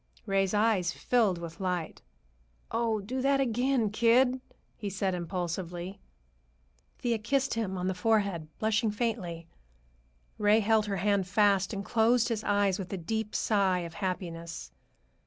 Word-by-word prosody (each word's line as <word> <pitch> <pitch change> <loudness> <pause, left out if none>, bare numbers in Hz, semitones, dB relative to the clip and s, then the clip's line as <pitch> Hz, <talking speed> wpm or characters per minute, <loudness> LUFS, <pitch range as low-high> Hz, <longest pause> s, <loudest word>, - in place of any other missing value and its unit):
Ray's 195 -1 +1
eyes 205 -5 +2
filled 220 -6 +1
with 170 -1 -8
light. 180 -4 -3 0.7
"Oh, 225 -2 0
do 255 +6 -3
that 275 +1 +3
again, 245 -2 +1
kid!" 250 +3 +3 0.3
he 205 - -4
said 195 -1 -1
impulsively. 175 +1 -4 1.0
Thea 235 -2 -1
kissed 270 +5 0
him 210 -4 -2
on 180 - -2
the 190 - +1
forehead, 200 -5 +1
blushing 220 +1 +1
faintly. 205 -7 -3 0.9
Ray 210 +1 +5
held 220 0 +2
her 200 -1 -1
hand 200 0 +1
fast 200 0 +3
and 200 -2 -4
closed 235 +1 +3
his 220 -2 -2
eyes 205 -2 +2
with 190 -1 -6
a 195 - -2
deep 220 +5 -3
sigh 195 -4 +2
of 170 -1 -7
happiness. 170 -4 -5
205 Hz, 140 wpm, -29 LUFS, 185-225 Hz, 1.0 s, Ray